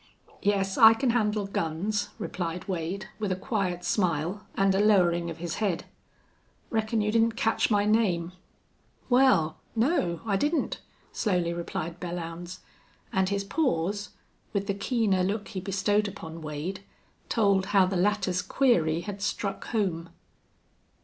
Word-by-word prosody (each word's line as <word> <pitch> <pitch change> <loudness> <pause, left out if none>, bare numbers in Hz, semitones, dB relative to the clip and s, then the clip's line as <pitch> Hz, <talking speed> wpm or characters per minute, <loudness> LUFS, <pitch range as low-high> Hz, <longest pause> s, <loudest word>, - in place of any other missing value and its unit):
"Yes, 195 -1 +1
I 225 0 +9
can 245 +1 +1
handle 210 -3 +1
guns," 195 +3 -2
replied 180 +1 -4
Wade, 185 +1 -3
with 210 -3 -1
a - - +1
quiet 185 -4 -2
smile 175 0 0
and 195 0 +3
a 190 - +2
lowering 175 -5 +3
of 165 - -6
his 170 -1 -4
head. 195 -6 0 0.9
"Reckon 220 -1 0
you 210 0 +1
didn't 230 0 +3
catch 225 -2 +1
my 205 -2 +3
name." 190 -6 +2 0.8
"Wal 205 -12 +4 0.2
no, 225 - +1
I 200 -3 +1
didn't," 300 - 0 0.3
slowly 180 -5 0
replied 170 0 -4
Belllounds, 175 +1 -6 0.5
and 190 -1 +2
his 200 0 -1
pause, 205 - -1 0.4
with 200 -1 0
the 200 - 0
keener 200 -2 +1
look 200 +3 -1
he 195 - -4
bestowed 200 +2 +1
upon 165 -5 -8
Wade, 155 +5 -4 0.5
told 200 -4 +2
how 195 -2 +5
the 190 +1 -2
latter's 185 -1 +1
query 180 - +2
had 200 +1 -6
struck 200 0 -2
home. 180 -7 -1
195 Hz, 140 wpm, -27 LUFS, 175-210 Hz, 0.9 s, I